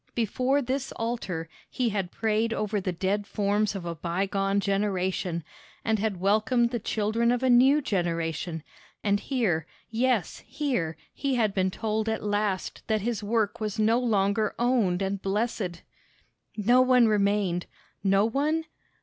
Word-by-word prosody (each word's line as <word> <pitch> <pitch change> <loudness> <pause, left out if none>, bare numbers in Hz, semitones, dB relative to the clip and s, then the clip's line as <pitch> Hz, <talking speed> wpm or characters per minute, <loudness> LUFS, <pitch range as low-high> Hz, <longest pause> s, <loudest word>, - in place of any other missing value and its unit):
Before 255 +5 +1
this 265 +2 -2
altar 225 -8 -3 0.2
he 250 -3 0
had 195 -4 -2
prayed 225 +1 0
over 210 -2 -1
the 185 - -1
dead 195 +4 -1
forms 205 +1 0
of 185 -3 -5
a 170 - -3
bygone 195 +4 0
generation, 190 -3 -1 0.4
and 220 -1 +2
had 205 -3 -1
welcomed 220 +5 +2
the 240 - -1
children 220 +3 +1
of 245 +1 0
a 260 - +4
new 270 +5 +5
generation; 165 - -2 0.4
and 205 -1 +2
here, 200 - 0 0.2
yes, 235 -4 0
here, 245 - -2 0.2
he 275 -2 -1
had 220 -4 +1
been 190 -1 +1
told 220 +2 -2
at 220 - -2
last 205 -2 -1
that 215 -1 +1
his 230 +1 -2
work 210 0 0
was 215 -2 -3
no 220 +2 +3
longer 210 -3 +1
owned 225 -7 +2
and 195 0 -2
blessed! 195 -3 -2 0.7
No 240 +5 +4
one 255 -2 +5
remained 200 -4 +1 0.4
no 195 +1 +4
one? 300 +7 0
210 Hz, 150 wpm, -27 LUFS, 195-235 Hz, 0.7 s, new